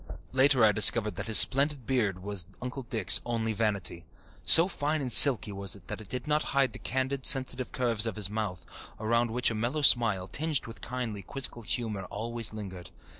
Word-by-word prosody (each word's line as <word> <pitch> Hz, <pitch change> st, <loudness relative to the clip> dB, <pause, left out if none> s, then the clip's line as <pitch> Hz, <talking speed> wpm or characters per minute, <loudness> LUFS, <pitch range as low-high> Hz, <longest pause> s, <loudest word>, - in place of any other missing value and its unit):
Later 130 Hz, -2 st, +2 dB
I 105 Hz, -, +3 dB
discovered 105 Hz, 0 st, +2 dB
that -, -, -6 dB
his 110 Hz, -, +7 dB
splendid 140 Hz, -1 st, +5 dB
beard 105 Hz, -8 st, -3 dB
was 100 Hz, -4 st, -3 dB
Uncle 125 Hz, +2 st, -8 dB
Dick's 115 Hz, -6 st, +1 dB
only 115 Hz, -2 st, -4 dB
vanity. 100 Hz, -6 st, -3 dB, 0.4 s
So 165 Hz, +2 st, +7 dB
fine 155 Hz, -4 st, -4 dB
and 130 Hz, -3 st, -2 dB
silky 120 Hz, -3 st, +7 dB
was 100 Hz, 0 st, -1 dB
it 90 Hz, -4 st, -19 dB
that -, -, -6 dB
it 105 Hz, -, -15 dB
did 125 Hz, +1 st, -6 dB
not 150 Hz, 0 st, -1 dB, 0.2 s
hide 135 Hz, -4 st, 0 dB
the -, -, -10 dB
candid, 130 Hz, +1 st, -4 dB
sensitive 130 Hz, -2 st, +1 dB
curves 115 Hz, -3 st, -2 dB
of 110 Hz, -, -6 dB
his 105 Hz, -3 st, -4 dB
mouth, 100 Hz, -4 st, -7 dB, 0.3 s
around 115 Hz, +2 st, -1 dB
which 125 Hz, +1 st, -1 dB
a -, -, -5 dB
mellow 120 Hz, +8 st, -4 dB
smile, 110 Hz, -8 st, +3 dB
tinged 150 Hz, -, -3 dB
with 115 Hz, -, -13 dB
kindly, 115 Hz, -5 st, -7 dB
quizzical 120 Hz, +4 st, -4 dB
humour, 110 Hz, -3 st, -5 dB
always 115 Hz, +3 st, -4 dB
lingered. 95 Hz, -5 st, -10 dB
115 Hz, 190 wpm, -27 LUFS, 105-130 Hz, 0.4 s, his